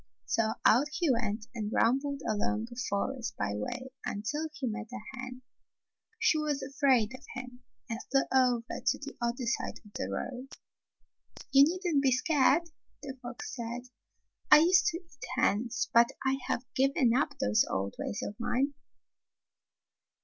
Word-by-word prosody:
So 220 -1 +1
out 255 +6 +6
he 335 -4 +2
went 215 -3 -1
and 215 -3 -3
rambled 275 +5 +1
along 220 +1 0
a - - -8
forest 235 +5 -2
byway 105 - -3 0.2
imtil 265 +10 -2
he 300 -4 -4
met 225 -1 -3
a 250 - -5 0.2
hen. 260 -1 -7 0.7
She 455 -9 +3
was 295 -2 -1
afraid 265 -4 +2
of 255 - -10
him 250 0 -8 0.3
and 230 -2 -4
flew 270 0 +4
over 250 -3 +2
to 270 - +2
the 280 0 -8
other 235 +1 -1
side 235 - -1
of 205 - -16
the 95 - -3
road. 250 - -4 1.0
"You 275 0 +8
needn't 345 -3 +1
be 270 -1 +3
scared," 285 +4 +3 0.4
the 270 -2 -6
fox 245 +2 -7
said. 235 0 -5 0.7
"I 300 - +9
used 360 +2 +5
to 340 -1 +1
eat 335 -5 -11
hens, 235 - +1
but 235 0 +7 0.2
I 265 0 +2
have 250 - -1
given 265 -2 +3
up 280 - 0
those 105 +1 +3
old 95 +1 -2
ways 230 - -3
of - - -4
mine." 265 +4 0
255 Hz, 155 wpm, -30 LUFS, 230-280 Hz, 1.0 s, I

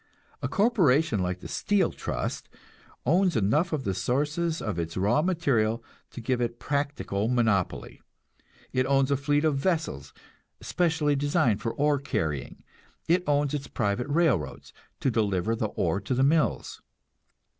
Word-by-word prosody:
A - - -1
corporation 165 - +3
like 90 0 -2
the - - -7
Steel 205 -2 +1
Trust - - -4 0.6
owns 175 +5 +3
enough 140 - +2
of 150 -4 -2
the 95 - -1
sources 150 - -1
of 105 -6 -3
its 85 +1 -4
raw 100 +10 +2
material 130 -11 +1 0.3
to - - -9
give 125 +2 -1
it 120 0 -2
practical 140 -9 -2
monopoly; 110 -7 0 0.7
it 130 0 +1
owns 135 0 +2
a - - +4
fleet 145 +2 +1
of 145 -3 +1
vessels 145 - -1 0.5
especially 160 -4 +1
designed 145 - +1
for 115 - -3
ore 145 0 +2
carrying; 80 - -3 0.4
it 175 +2 +3
owns 145 -1 +1
its 145 -1 -3
private 110 +4 -1
railroads, 140 - 0 0.3
to 135 - +1
deliver 105 -1 0
the 110 -1 -1
ore 95 -1 -1
to 120 +5 -2
the 130 - +2
mills. 150 +3 +1
135 Hz, 145 wpm, -27 LUFS, 110-150 Hz, 0.7 s, a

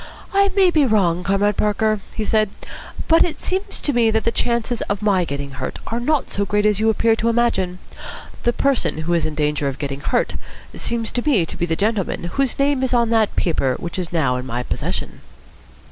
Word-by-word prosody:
"I 395 0 +4
may 380 -3 +5
be 310 -3 +3
wrong, 185 -8 +2
Comrade 200 +2 +1
Parker," 215 0 +1 0.2
he 220 - -2
said, 215 -1 +2 0.6
"but 330 0 +6
it 345 - -3
seems 380 +2 -3
to 290 - 0
me 235 -2 +3
that 220 0 +1
the 230 - +1
chances 235 0 -1
of 200 0 -2
my 195 -4 +3
getting 140 -2 -5
hurt 135 - -5
are 230 - -2
not 290 +3 0
so 200 - 0
great 210 +1 0
as 210 -1 +3
you 220 +1 +3
appear 225 +1 +3
to 230 - +1
imagine. 225 -6 +1 0.6
The 240 - +2
person 275 - 0
who 170 +2 0
is 170 -2 +1
in 155 - -5
danger 150 -1 0
of 135 -1 -3
getting 140 -1 -4
hurt - - 0 0.4
seems 230 -1 -2
to 245 - -1
me 205 - +3
to - - -7
be 175 - -2
the 165 - 0
gentleman 205 -1 -1
whose 275 -3 0
name 280 -1 +2
is 260 -1 +1
on 235 -1 +2
that 220 -2 +2
paper 135 -7 +1
which 170 +2 -5
is 175 -3 -4
now 140 -7 +1
in 125 +1 -6
my 125 0 -3
possession." - - -4
215 Hz, 215 wpm, -20 LUFS, 170-240 Hz, 0.6 s, but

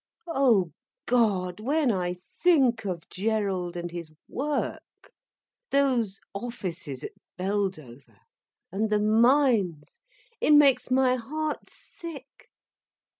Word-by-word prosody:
Oh 240 - +3 0.3
God, 205 -7 +1
when 275 +3 +1
I 180 -3 -1 0.3
think 265 -11 +4
of 175 -4 -4
Gerald, 195 -4 -1
and 175 0 -4
his 170 -2 -7 0.2
work—those 275 - -3
offices 185 - -5
at - - -5 0.3
Beldover, 185 -10 -3 0.5
and 215 +3 -1
the 210 - +3
mines—it 235 - +1
makes 280 -4 +5
my 255 0 +3
heart 305 +6 -4
sick. 285 -5 -11
220 Hz, 90 wpm, -27 LUFS, 185-275 Hz, 0.5 s, makes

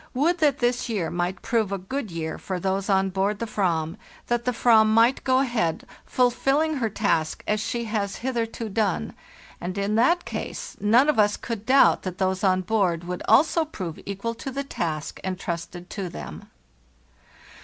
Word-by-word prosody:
Would 335 +7 +2
that 290 -3 +3
this 245 -1 0
year 200 -8 -1
might 175 +1 -2
prove 225 -5 0
a 200 - -1
good 220 +6 -4
year 160 -2 -4
for 185 -2 -4
those 190 +2 -1
on 190 -1 +2
board 195 +2 0
the 230 - -3
"vam; 170 -6 -1 0.3
that 240 0 0
the 250 - +2
/vam 225 -2 +5
might 230 +4 +4
go 260 0 +3
ahead, 235 -11 -1 0.2
fulfilling 270 +5 +2
her 230 -4 0
task 180 -7 0
as 210 0 +1
she 235 +1 -2
has 210 -3 -2
hitherto 230 -3 -2
done; 200 - -1 0.5
and 180 +2 -4
in 200 +1 0
that 340 +10 +3
case - - -5
none 230 +7 +4
of 300 -7 +2
us 205 -1 +3
could 225 -3 -6
doubt 270 +1 +5
that 185 -1 -5
those 190 0 0
on 185 -1 +3
board 180 -4 0
would 180 +1 -5
also 310 +9 +4
prove 185 - -6
equal 200 +4 -3
to 230 +4 -6
the 275 +1 -3
task 160 - -4
intrusted 175 -1 -5
to 195 -4 -4
them. - - -9
210 Hz, 175 wpm, -25 LUFS, 185-245 Hz, 0.5 s, vam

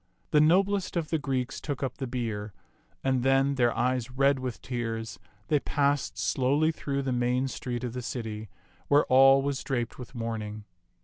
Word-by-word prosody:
The 150 - +5
noblest 190 +4 +3
of 160 -3 -2
the 160 - +1
Greeks 130 -3 -2
took 145 -3 -4
up 135 - -3
the 135 - -3
bier, 110 -4 -3 0.5
and 130 -2 +1
then, 135 +2 +3
their 120 -3 +3
eyes 125 0 0
red 135 +1 +2
with 130 -2 -4
tears, 115 -2 -4 0.3
they 150 - +3
passed 140 -10 0
slowly 130 - +2
through 140 -3 -3
the 135 - -1
main 125 +2 +1
street 125 -2 -4
of 120 -2 -3
the 125 - -4
city, 110 -3 -5 0.4
where 145 +1 +4
all 135 +1 +7
was 140 -1 -2
draped 120 -3 -2
with 125 +1 -9
mourn 115 -1 -3
ing. 105 0 -7
130 Hz, 180 wpm, -28 LUFS, 120-140 Hz, 0.5 s, all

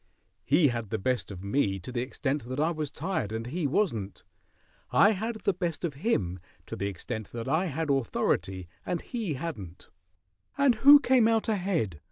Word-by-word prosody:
He 150 +1 +4
had 115 -4 -4
the - - -1
best 125 +2 -1
of 95 -2 -8
me 100 -2 +1
to 95 +7 -8
the 120 -1 -1
extent 135 +1 -2
that 130 +3 -4
I 160 +3 +2
was 155 -3 -3
tired 150 - -3
and 110 +1 -3
he 150 +5 -2
wasn't. 115 - -1 0.7
I 205 - +5
had 220 +3 -2
the 200 - +1
best 175 -3 -3
of 170 -4 -1
him 105 - -1 0.3
to - - -6
the 100 - -2
extent 100 +2 -6
that 115 0 -5
I 160 +7 +1
had 160 -1 -1
authority 95 -8 0 0.2
and 175 - -2
he 220 - -3
hadn't 125 - -7 0.3
" - - -54 0.3
"And 280 -3 +5
who 280 +6 +8
came 255 -4 +4
out 225 -1 +2
ahead?" 175 - -1
145 Hz, 190 wpm, -28 LUFS, 110-185 Hz, 0.7 s, who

